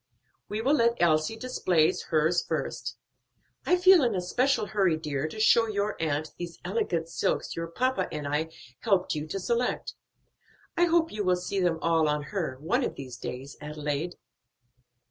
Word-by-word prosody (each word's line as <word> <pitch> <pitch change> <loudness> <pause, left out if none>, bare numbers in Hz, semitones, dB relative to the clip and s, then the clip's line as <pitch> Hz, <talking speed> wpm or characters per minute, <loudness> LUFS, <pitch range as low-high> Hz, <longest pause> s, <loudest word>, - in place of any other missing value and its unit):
We 210 +1 -2
will 275 +4 +3
let 235 -4 +3
Elsie 155 +3 +2
display 185 -9 +2
hers 160 +2 +2
first. - - -3 0.7
I 360 - +4
feel 365 -3 +7
in 235 -4 +1
a 185 - 0
special 250 +7 +1
hurry, 195 -6 +1
dear, 150 -2 -2
to 215 - -8
show 225 +1 +5
your 205 0 -1
aunt 155 -1 -1
those 170 -1 -6
elegant 175 -4 -1
silks 165 - -1
your 165 0 -3
papa 255 +10 0
and 150 -2 -4
I 150 +3 -1 0.3
helped 195 -4 +1
you 150 0 -4
to 195 +5 -3
select. 235 +6 -1 0.8
I 350 - +4
hope 335 -1 +2
you 210 -1 -3
will 185 -1 +3
see 180 +2 -3
them 175 -3 +2
all 165 -2 +3
on 150 0 0
her, 165 -10 -2
one 210 - 0
of - - -2
these 130 -3 -8
days, 130 +2 -7
Adelaide. 150 +2 -3
175 Hz, 170 wpm, -28 LUFS, 155-225 Hz, 0.8 s, feel